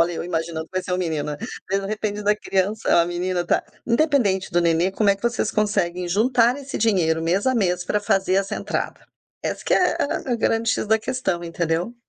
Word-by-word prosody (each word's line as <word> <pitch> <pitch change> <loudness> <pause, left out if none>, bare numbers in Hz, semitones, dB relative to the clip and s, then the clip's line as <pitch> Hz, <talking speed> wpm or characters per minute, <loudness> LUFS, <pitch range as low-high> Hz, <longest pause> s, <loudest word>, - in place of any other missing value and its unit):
Olha 170 +1 +3
eu 165 - -4
imaginando 165 -2 -3
que - - -35
vai 185 0 -1
ser 185 - -5
um 180 - +2
menino. 155 -4 -2 0.3
De 195 0 0
repente, 210 0 -3
da 210 +1 +3
criança 200 +1 -1
é - - +5
uma 170 0 +4
menina, 175 0 -2
tá. - - +2 0.2
Independente 235 -7 +2
do 175 - +3
nenê, 170 +2 +2
como 200 +1 +2
é 195 - +2
que 200 - -26
vocês 235 -2 0
conseguem 180 -4 0
juntar 240 +5 +3
esse 280 -1 -6
dinheiro 170 -7 +2
mês 185 +7 0
a 260 - +3
mês 180 -5 +1
pra 210 - 0
fazer 190 -2 +1
essa 195 0 0
entrada. - - -4 0.4
Essa - - -3
que - - +3
é - - +2
a 270 -3 -2
a - - +1
grande 225 0 +1
"X" 220 - -1
da 220 +1 +3
questão, 215 -8 -2
entendeu? 170 +5 -2
195 Hz, 220 wpm, -23 LUFS, 175-220 Hz, 0.4 s, é